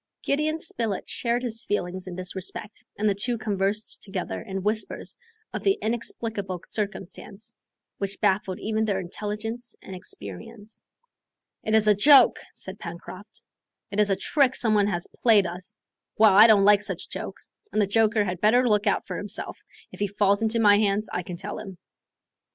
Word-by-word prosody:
Gideon 305 +3 0
Spilett 225 - -3
shared 240 +1 -1
his 230 -2 -3
feelings 185 -2 -3
in 180 - -6
this 185 +1 -6
respect, 195 +3 -5
and 215 - +1
the 205 - +3
two 235 +5 -1
conversed 210 0 -1
together 195 -3 -4
in 195 -3 -5
whispers 215 +1 -2 0.4
of - - -3
the 395 +1 +2
inexplicable 220 -4 -3
circumstance 200 0 -5 0.5
which 200 0 -3
baffled 190 -1 +1
even 220 0 -1
their 200 -3 0
intelligence 215 +5 -5
and 190 - -9
experience. 220 +3 -7 0.8
"It 220 - +1
is 220 -1 +4
a 210 - +7
joke," 260 +5 +6
said 190 +2 -7
Pencroft; 185 +4 -9 0.5
"it 200 - -2
is 210 -1 +4
a 195 - +3
trick 270 +4 +2
some 220 -3 +2
one 205 -1 +3
has 175 -4 -2
played 215 -5 +5
us. 180 +2 -6 0.4
Well, 215 -2 +6
I 210 +4 +9
don't 205 -3 +6
like 205 0 +6
such 210 - -3
jokes, - - -7 0.2
and - - 0
the 210 - +4
joker 215 +1 +3
had 180 -2 -4
better 245 +4 +4
look 210 -1 +2
out 200 - +1
for - - -5
himself, 205 - -6 0.3
if - - -12
he 205 - +1
falls 200 +1 +2
into 225 +1 +1
my 205 -2 +6
hands, 210 0 +1
I 180 - -1
can 175 0 -7
tell 205 +3 -5
him." 190 -3 -9
210 Hz, 175 wpm, -25 LUFS, 195-220 Hz, 0.8 s, I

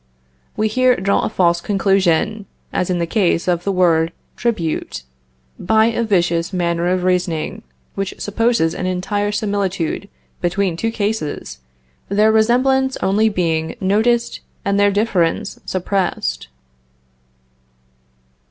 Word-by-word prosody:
We 215 - +2
here 255 +3 +3
draw 200 -1 +1
a - - -1
false 170 -2 +2
conclusion, 195 +1 +1 0.3
as 180 - -1
in 180 - +1
the 170 - 0
case 175 -1 +1
of 175 -1 +1
the 200 - 0
word 170 -3 +2 0.2
tribute, 170 - -2 0.6
by 220 +4 +3
a 235 - -1
vicious 175 -6 +1
manner 170 -2 0
of 180 0 0
reasoning, 180 -3 -1 0.3
which 195 -1 -4
supposes 210 -6 +1
an 185 - -3
entire 205 +3 -1
similitude 200 -3 -2 0.3
between 180 0 0
two 225 +7 -1
cases, 205 - -3 0.5
their 210 +2 +4
resemblance 260 +4 +2
only 210 +3 +3
being 165 -5 -1
noticed 225 +5 +1 0.3
and 200 0 +1
their 205 0 +5
difference 200 -5 0
suppressed. 180 - -2
195 Hz, 120 wpm, -19 LUFS, 175-215 Hz, 0.6 s, their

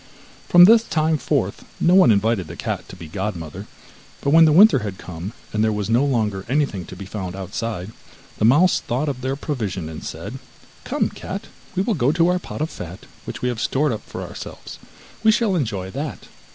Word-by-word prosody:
From 175 0 +9
this 225 +3 +7
time 160 -6 0
forth - - -1 0.2
no 175 - +4
one 185 -9 +7
invited 105 -3 +1
the 85 - -8
cat - - -4
to - - -9
be 85 -3 -10
godmother, 85 -3 -5 0.5
but 140 - 0
when 165 +1 +8
the 155 - +5
winter 190 -1 +7
had 100 -4 -5
come 90 +2 -7 0.2
and 105 0 +1
there 110 - +2
was 105 +1 -2
no 120 +4 +4
longer 110 -8 0
anything 135 - 0
to - - -9
be 95 - -8
found 95 -2 -5
outside, 95 +1 -4 0.5
the - - 0
mouse 155 +10 +5
thought 130 +6 -2
of 135 -3 -3
their 130 +2 -1
provision, 105 - -3
and 80 - -8
said: - - -6 0.5
'Come, - - 0
cat, - - -7 0.3
we 190 - +1
will 225 - 0
go 140 -6 +2
to 170 +1 +3
our 180 0 +2
pot 160 - -7
of 160 - -1
fat 90 +1 -9 0.2
which - - -7
we 125 - +2
have 120 -2 -3
stored 145 +1 +1
up 110 -2 -3
for - - -7
ourselves - - -9 0.4
we 220 - +6
shall 220 -4 +2
enjoy 105 - -2
that. 145 +5 -5
120 Hz, 205 wpm, -22 LUFS, 95-155 Hz, 0.5 s, From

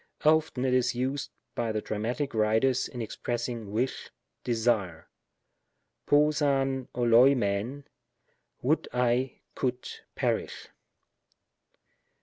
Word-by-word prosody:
Often 155 -4 +3
it 130 - +2
is 125 -1 +2
used 130 +3 -2 0.2
by 115 -2 -1
the 110 - -1
Dramatic 120 +8 -3
writers 110 +4 +2
in 120 -2 -5
expressing 115 -1 -4
wish, 125 +5 -2 0.3
desire; 110 -8 0 1.0
n^q 150 +1 +3
av 135 -2 0
oXoifiriVy 120 0 +3 0.4
" - - -45
would 150 +6 +1
I 125 +1 0
could 125 -1 -2 0.3
perish." - - -2
125 Hz, 100 wpm, -28 LUFS, 115-135 Hz, 1.0 s, Often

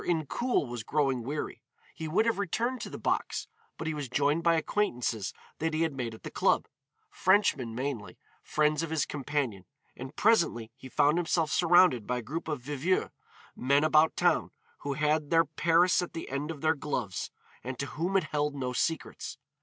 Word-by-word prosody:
Incoul 170 - 0
was 120 -1 -5
growing 135 0 0
weary; 145 +6 -4 0.3
he 160 - -5
would 185 +8 +2
have 230 -3 +1
returned 230 +6 -1
to - - -5
the - - -7
box, - - -1 0.3
but - - -5
he 160 - -1
was 145 -4 -4
joined 145 +5 +2
by 170 0 +4
acquaintances 125 - -1 0.3
that 160 0 -1
he 160 - +2
had 160 -3 0
made 120 -4 -4
at - - -16
the - - -6
club, - - +2 0.4
Frenchmen 175 - +2
mainly, 130 -4 -4 0.2
friends 150 0 +1
of 165 - -3
his 160 -2 +1
companion, 140 -8 -2 0.3
and 130 +3 -8
presently 170 - +2
he 130 -1 -11
found 150 +6 +3
himself 165 -2 +1
surrounded 175 - +5
by 125 - 0
a - - -3
group 155 +9 -5
of 150 -6 -3
viveurs, 145 +6 0 0.4
men 140 +3 +2
about 155 0 +4
town, 175 -2 +2 0.3
who 140 - -3
had 150 +1 +1
their 165 0 +4
Paris 170 +4 +3
at 180 - -5
the 165 - -6
end 140 +3 -2
of 155 -4 -6
their 160 0 +3
gloves, 125 - -3 0.3
and 130 0 -5
to 140 - -2
whom 175 +7 -1
it 190 - +2
held 150 -1 -1
no 130 -2 -3
secrets. 160 +5 -2
150 Hz, 185 wpm, -29 LUFS, 130-165 Hz, 0.4 s, surrounded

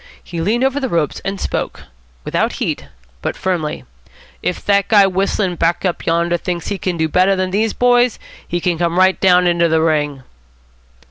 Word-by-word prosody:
He 170 -2 -5
leaned 225 +8 +1
over 270 +1 +1
the 265 -2 -2
ropes, 165 -6 -1
and 195 0 -3
spoke - - -3 0.4
without - - 0
heat, - - -3 0.3
but - - -3
firmly. 155 - -2 0.6
"If 180 - -3
that 200 -1 +2
guy 205 -3 +6
whistling 190 -1 0
back 170 +3 0
up 180 - -2
yonder 170 +1 +1
thinks 175 0 -4
he 200 -2 -3
can 180 -2 -2
do 160 0 +1
better 185 +4 +3
than 185 -1 -1
these 215 +3 0
boys, 245 -1 +3 0.3
he 175 - -2
can 175 -2 -1
come 170 0 0
right 185 0 +4
down 180 -2 +4
into 170 -1 +3
the 160 0 +2
ring." 150 -4 0
180 Hz, 185 wpm, -17 LUFS, 170-195 Hz, 0.6 s, guy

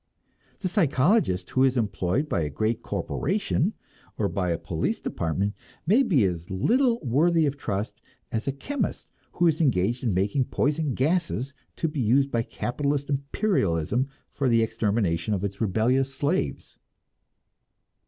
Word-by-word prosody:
The 185 - 0
psychologist 160 - +2
who 130 - +3
is 130 -1 +3
employed 105 - 0
by 85 - 0
a 75 - -1
great 110 +10 -1
corporation, 65 -4 -1 0.4
or - - +1
by 90 0 -1
a 85 - +1
police - - -2
department, 95 +5 -2 0.3
may 215 +11 +5
be 180 - +3
as 90 -3 -2
little 235 - +2
worthy 160 +5 +3
of 140 -1 0
trust 105 -6 -4 0.3
as 115 +2 -2
a - - +2
chemist 265 - -3 0.3
who 175 - +1
is 160 -1 +3
engaged 120 - +1
in 120 - +1
making 100 +8 +1
poison 150 0 0
gases 145 -2 0 0.2
to 165 - -1
be 150 -2 -4
used 135 +4 +3
by 115 - +1
capitalist 140 +4 -2
imperialism 135 - 0 0.2
for 135 -3 0
the 115 -1 +4
extermination 105 -4 0
of 95 - -4
its 100 +1 -4
rebellious 120 +6 +2
slaves. 140 - -2
125 Hz, 145 wpm, -26 LUFS, 100-150 Hz, 0.4 s, may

